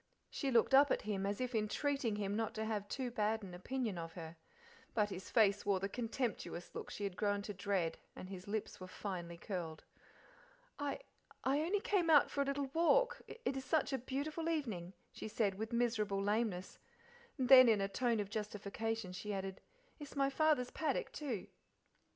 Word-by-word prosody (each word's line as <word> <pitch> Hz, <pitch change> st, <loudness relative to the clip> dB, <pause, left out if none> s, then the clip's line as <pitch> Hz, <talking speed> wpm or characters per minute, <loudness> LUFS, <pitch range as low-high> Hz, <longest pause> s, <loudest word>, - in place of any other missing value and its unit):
She 275 Hz, -, -1 dB
looked 235 Hz, 0 st, +4 dB
up, 280 Hz, +1 st, +8 dB
at -, -, +1 dB
him 200 Hz, -2 st, -1 dB
as 200 Hz, 0 st, -2 dB
if 255 Hz, 0 st, -2 dB
entreating 230 Hz, +2 st, 0 dB
him 205 Hz, -1 st, -1 dB
not 225 Hz, -1 st, -1 dB
to 220 Hz, -, -2 dB
have 210 Hz, -2 st, -2 dB
too 250 Hz, +3 st, -3 dB
bad 220 Hz, -1 st, 0 dB
an 185 Hz, -2 st, -8 dB
opinion 215 Hz, +1 st, -2 dB
of 165 Hz, 0 st, -6 dB
her; 165 Hz, -1 st, -8 dB, 0.6 s
but 210 Hz, -2 st, +2 dB
his 185 Hz, 0 st, -6 dB
face 205 Hz, -3 st, +4 dB
wore 200 Hz, -2 st, +2 dB
the 195 Hz, -, -1 dB
contemptuous 225 Hz, -5 st, -3 dB
look -, -, -6 dB
she 205 Hz, -, -5 dB
had 195 Hz, -3 st, -2 dB
grown 205 Hz, 0 st, 0 dB
to 205 Hz, -, -5 dB
dread 190 Hz, -3 st, -1 dB, 0.2 s
and 185 Hz, -, -7 dB
his 185 Hz, 0 st, -8 dB
lips 215 Hz, +1 st, -3 dB
were 185 Hz, -, -7 dB
finely 180 Hz, -3 st, -5 dB
curled. 170 Hz, -4 st, -5 dB, 1.0 s
"I 290 Hz, -, -2 dB, 0.4 s
I 270 Hz, +2 st, +2 dB
only 380 Hz, +6 st, +1 dB
came 370 Hz, -6 st, +2 dB
out 300 Hz, -3 st, +6 dB
for 280 Hz, -, 0 dB
a -, -, +2 dB
little 275 Hz, -1 st, -2 dB
walk; 485 Hz, +9 st, +3 dB
it 465 Hz, -, -3 dB
is 265 Hz, -, -3 dB
such 295 Hz, -1 st, +1 dB
a 265 Hz, -, +1 dB
beautiful 295 Hz, +6 st, -2 dB
evening," 215 Hz, -, -2 dB, 0.2 s
she -, -, -6 dB
said, 210 Hz, -2 st, +1 dB
with 220 Hz, +4 st, -5 dB
miserable 225 Hz, -4 st, +1 dB
lameness; 205 Hz, -2 st, -1 dB, 0.6 s
and 260 Hz, -3 st, 0 dB
then 255 Hz, -2 st, +10 dB
in 215 Hz, -2 st, +4 dB
a 195 Hz, -, +1 dB
tone 235 Hz, +2 st, +1 dB
of 205 Hz, -1 st, -3 dB
justification 215 Hz, 0 st, -3 dB
she 210 Hz, +3 st, -4 dB
added, 195 Hz, -1 st, -4 dB, 0.4 s
"it's 295 Hz, -1 st, -9 dB
my 275 Hz, -1 st, +2 dB
father's 295 Hz, -4 st, +2 dB
paddock, 305 Hz, -4 st, -1 dB
too." 255 Hz, -10 st, -3 dB
220 Hz, 190 wpm, -37 LUFS, 195-270 Hz, 1.0 s, then